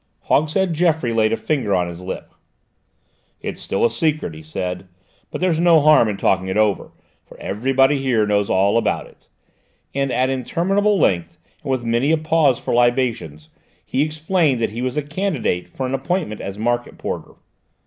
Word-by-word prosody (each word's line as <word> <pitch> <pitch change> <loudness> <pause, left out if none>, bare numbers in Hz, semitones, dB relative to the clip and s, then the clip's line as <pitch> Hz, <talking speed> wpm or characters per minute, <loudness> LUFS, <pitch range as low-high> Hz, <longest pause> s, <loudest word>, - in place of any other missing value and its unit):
Hogshead 165 +4 +1
Geoffroy 160 -7 +1
laid 110 -1 +2
a 115 - +1
finger 125 -10 0
on 90 -1 +1
his 85 0 -8
lip. 90 - -7 1.1
"It's - - -6
still 95 - 0
a - - +4
secret," 150 - -1
he 80 - -10
said, 90 +4 -5 0.4
"but - - -6
there's 175 -3 +1
no 170 -2 +6
harm 150 -6 +5
in 100 - -3
talking 95 -1 +1
it 95 - -2
over, 105 -4 +1 0.3
for - - -16
everybody 135 +6 +1
here 120 -5 +2
knows 105 -1 +1
all 100 +4 +3
about - - -1
it," - - -21 0.7
and 135 -1 -1
at 130 +1 +1
interminable 195 - +1
length, 85 - +1 0.2
and - - -7
with 130 -2 0
many 120 +5 +1
a 160 - +4
pause 155 -4 +2
for - - -3
libations, 120 - 0 0.4
he 130 - -1
explained 155 -2 +1
that 115 - -1
he 115 +3 -5
was 130 +3 -2
a 150 - 0
candidate 150 - -2
for 130 - -4
an 130 - -3
appointment 135 - -2
as 100 0 -6
Market 120 +2 -2
Porter. - - -5
130 Hz, 180 wpm, -20 LUFS, 105-155 Hz, 1.1 s, no